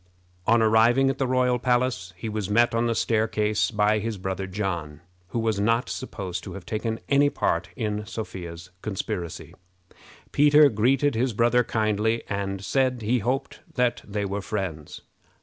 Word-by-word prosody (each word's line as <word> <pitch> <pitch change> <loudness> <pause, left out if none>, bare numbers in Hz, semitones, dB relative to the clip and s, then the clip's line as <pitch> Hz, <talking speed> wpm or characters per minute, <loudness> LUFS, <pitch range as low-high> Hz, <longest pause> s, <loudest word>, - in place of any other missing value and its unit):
On 115 0 +5
arriving 115 +5 +4
at - - -8
the 135 - +1
royal 125 -1 +2
palace, 120 -7 0
he 100 - -5
was 105 -2 -3
met 120 +3 +3
on 115 +1 +1
the 115 - 0
staircase 110 -2 +1
by 105 -1 +2
his 110 0 -3
brother 95 0 -3
John, 85 -6 -4 0.3
who 105 - -5
was 110 -3 0
not 115 +4 +1
supposed 95 -9 -5
to - - -7
have 100 - -9
taken 110 +1 -3
any 145 0 +4
part 85 -8 -1
in 105 -1 -3
Sophia's 90 -5 -7
conspiracy. 90 -4 -4 0.8
Peter 150 0 +6
greeted 130 +6 +2
his 120 +2 0
brother 120 +3 +3
kindly, 110 0 0
and 100 -1 -3
said 130 0 +1
he 120 +4 +2
hoped 125 +5 -2 0.2
that 125 -2 +1
they 105 0 -3
were 100 +1 -3
friends. 95 -8 -5
110 Hz, 160 wpm, -25 LUFS, 100-120 Hz, 0.8 s, Peter